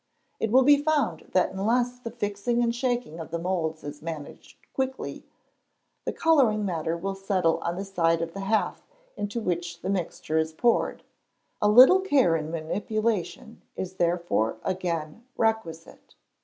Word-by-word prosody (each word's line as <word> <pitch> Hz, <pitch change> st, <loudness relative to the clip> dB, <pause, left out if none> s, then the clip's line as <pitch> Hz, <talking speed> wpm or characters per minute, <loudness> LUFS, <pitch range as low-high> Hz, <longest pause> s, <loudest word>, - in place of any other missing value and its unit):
It 225 Hz, -, 0 dB
will 260 Hz, +2 st, +6 dB
be 285 Hz, +1 st, +6 dB
found 290 Hz, -, 0 dB
that 185 Hz, 0 st, +3 dB
unless 240 Hz, +6 st, 0 dB
the 240 Hz, -2 st, -6 dB
fixing 230 Hz, +1 st, -1 dB
and 235 Hz, 0 st, +1 dB
shaking 240 Hz, -, -2 dB
of 160 Hz, -, -7 dB
the 170 Hz, -, -2 dB
moulds 165 Hz, -3 st, -2 dB
is 145 Hz, 0 st, -8 dB
managed 155 Hz, -2 st, -8 dB, 0.2 s
quickly, 265 Hz, 0 st, -4 dB, 0.8 s
the -, -, -1 dB
colouring 255 Hz, -11 st, +3 dB
matter 165 Hz, -2 st, -2 dB
will 195 Hz, +3 st, -3 dB
settle 190 Hz, -4 st, 0 dB
on 170 Hz, -, -3 dB
the 195 Hz, +2 st, -4 dB
side 165 Hz, -4 st, +1 dB
of 165 Hz, 0 st, -6 dB
the 195 Hz, -, -6 dB
half 205 Hz, +3 st, 0 dB, 0.3 s
into 205 Hz, +3 st, -3 dB
which 175 Hz, -4 st, -3 dB
the 190 Hz, -, -1 dB
mixture 165 Hz, -4 st, -1 dB
is 160 Hz, 0 st, -1 dB
poured; 235 Hz, +8 st, +1 dB, 0.6 s
a 210 Hz, -, +4 dB
little 255 Hz, -, +8 dB
care 275 Hz, -, +3 dB
in 155 Hz, -1 st, -3 dB
manipulation 210 Hz, +6 st, -2 dB
is 190 Hz, 0 st, -5 dB
therefore 170 Hz, -11 st, 0 dB
again 175 Hz, +1 st, -3 dB
requisite. 220 Hz, -8 st, -2 dB
195 Hz, 155 wpm, -26 LUFS, 165-235 Hz, 0.8 s, little